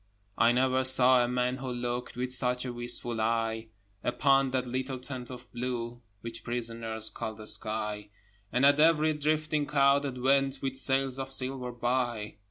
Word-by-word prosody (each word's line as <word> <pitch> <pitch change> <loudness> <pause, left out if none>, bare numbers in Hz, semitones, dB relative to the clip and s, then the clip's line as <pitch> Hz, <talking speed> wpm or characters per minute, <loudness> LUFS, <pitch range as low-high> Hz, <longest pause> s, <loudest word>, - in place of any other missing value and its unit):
I 115 - +4
never 130 +1 +1
saw 130 -1 +8
a - - -1
man 125 +1 -1
who 130 -1 -5
looked 120 0 -4
With 125 0 -2
such 125 0 +1
a 125 - -5
wistful 120 -1 -2
eye 115 0 -1 0.4
Upon 135 +2 +2
that 130 0 -2
little 130 +2 -4
tent 125 -1 -8
of 125 -1 -10
blue 120 -1 -5 0.2
Which 115 0 -7
prisoners 115 -2 -2
call 110 - -6
the 110 0 -11
sky, 105 -1 -3 0.4
And 125 +4 +2
at 145 +1 +4
every 155 0 +3
drifting 155 0 -1
cloud 140 0 +3
that 135 -3 -5
went 135 +1 +1
With 135 -1 -4
sails 135 0 +1
of 135 0 -5
silver 130 -1 0
by. 120 -3 -2
125 Hz, 170 wpm, -28 LUFS, 120-135 Hz, 0.4 s, saw